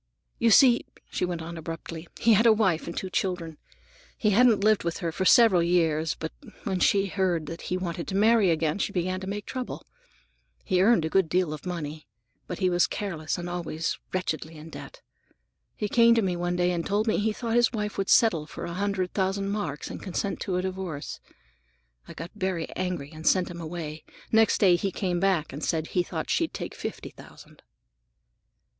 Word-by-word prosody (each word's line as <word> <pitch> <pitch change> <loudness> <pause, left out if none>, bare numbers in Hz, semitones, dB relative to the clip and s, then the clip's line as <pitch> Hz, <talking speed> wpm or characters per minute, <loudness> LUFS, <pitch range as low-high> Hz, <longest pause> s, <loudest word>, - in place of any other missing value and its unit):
"You 235 - +4
see," 240 +2 +6 0.2
she - - 0
went 175 -2 -4
on 170 0 -7
abruptly, 165 +1 -7
"he 230 -1 +5
had 220 +3 +5
a - - +8
wife 190 -7 +1
and 170 - -6
two 190 - -4
children. 180 -7 -2 0.6
He 215 - +2
hadn't 225 -1 +4
lived 215 -1 +4
with 170 -1 -2
her 170 -3 -2
for 190 +4 -2
several 200 -2 +6
years, 165 -2 +1
but 160 - -5 0.3
when 190 -2 -1
she 195 +2 +3
heard 185 -4 0
that 165 +2 -7
he 185 - 0
wanted 170 -2 -4
to 190 - -3
marry 215 -1 +4
again, 160 +1 0
she 200 - -1
began 185 0 -1
to 190 - -7
make 205 0 -4
trouble. 255 -1 -5 0.8
He 185 -1 +2
earned 195 -5 +4
a - - -1
good 190 -1 +2
deal 180 -3 +1
of 155 +4 -8
money, 155 -4 -5 0.4
but 180 - -5
he 185 - +1
was 175 -1 +3
careless 170 -7 -3
and 175 0 -5
always 170 -2 -3
wretchedly 165 -3 -3
in 155 +2 -11
debt. - - -10 0.7
He 210 - -2
came 235 +2 +5
to 225 - +2
me 185 -2 0
one 175 0 -1
day 180 0 +2
and 170 -1 -1
told 205 +4 0
me 220 - +2
he 220 +1 +1
thought 230 +1 -3
his 240 -1 +4
wife 210 -3 -3
would 195 - -1
settle 165 -10 +4
for - - -7
a 170 - -5
hundred 195 -1 -1
thousand 195 0 0
marks 160 -9 -4
and - - -7
consent 195 +1 -3
to 185 -3 -2
a 180 - -1
divorce. 185 -6 -5 0.9
I - - -10
got 165 +4 -7
very 185 -5 -2
angry 175 -6 -3
and 155 +1 -6
sent 185 -2 +3
him 170 -1 -7
away. 160 -2 -6 0.3
Next 220 -1 +4
day 180 -4 +5
he 195 +2 -2
came 180 -2 -1
back 185 -7 +1
and 145 - -6
said 160 -1 -1
he 180 - +1
thought 175 - -4
she'd - - 0
take - - -5
fifty - - -6
thousand." - - -15
180 Hz, 205 wpm, -27 LUFS, 165-200 Hz, 0.9 s, a